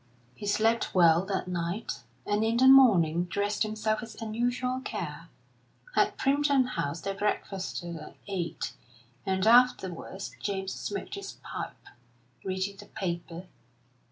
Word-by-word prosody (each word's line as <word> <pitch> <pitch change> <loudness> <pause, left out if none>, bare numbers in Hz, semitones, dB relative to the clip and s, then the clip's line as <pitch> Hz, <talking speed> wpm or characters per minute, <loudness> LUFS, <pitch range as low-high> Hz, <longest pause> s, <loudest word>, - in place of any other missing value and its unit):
He 205 - -7
slept 225 +2 +2
well 170 -1 +6
that 190 -2 -2
night, 175 +3 -3 0.3
and 205 +1 +1
in 225 +1 +1
the 260 +2 +6
morning 180 -11 +6
dressed 205 +4 -1
himself 215 0 0
with 230 -1 -9
unusual 245 +3 -1
care. 260 - -5 0.7
At - - +3
Primpton 280 -2 +3
House 165 - -2
they 195 +2 -2
breakfasted 190 -4 -3
at 155 - -10
eight, 185 -4 -3 0.5
and 190 0 +1
afterwards 220 -5 +3
James 195 -1 -2
smoked - - -5
his 400 - -6
pipe, - - -6 0.6
reading 190 +1 -2
the 205 - -11
newspaper. 170 -1 -4
200 Hz, 130 wpm, -29 LUFS, 180-230 Hz, 0.7 s, well